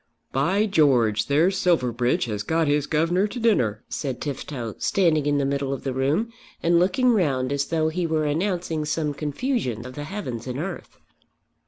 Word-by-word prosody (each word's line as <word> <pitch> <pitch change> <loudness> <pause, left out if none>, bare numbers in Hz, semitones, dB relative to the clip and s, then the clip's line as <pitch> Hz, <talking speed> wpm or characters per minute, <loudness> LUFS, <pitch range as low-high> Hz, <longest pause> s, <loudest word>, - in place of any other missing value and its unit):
"By 185 +11 +2
George, 130 - +3
there's 170 +7 +2
Silverbridge 125 -8 +1
has 105 -3 -3
got 160 +8 0
his 145 0 +1
governor 170 +6 +2
to 245 +4 -6
dinner," 125 - +1
said 135 -4 -4
Tifto, 135 -5 -5
standing 160 -6 +2
in 145 0 +2
the 140 - +1
middle 140 0 -1
of 135 - -6
the 135 - -2
room, 150 - 0 0.3
and 170 0 +4
looking 195 +8 +3
round 140 - +1
as 140 0 0
though 160 -1 0
he 170 +1 -1
were 155 -1 0
announcing 165 0 -1
some 150 -1 -1
confusion 145 - -2
of 130 - -8
the 145 +2 -6
heavens 130 - -5
and 125 0 -4
earth. 175 +7 -6
150 Hz, 175 wpm, -24 LUFS, 130-175 Hz, 0.3 s, and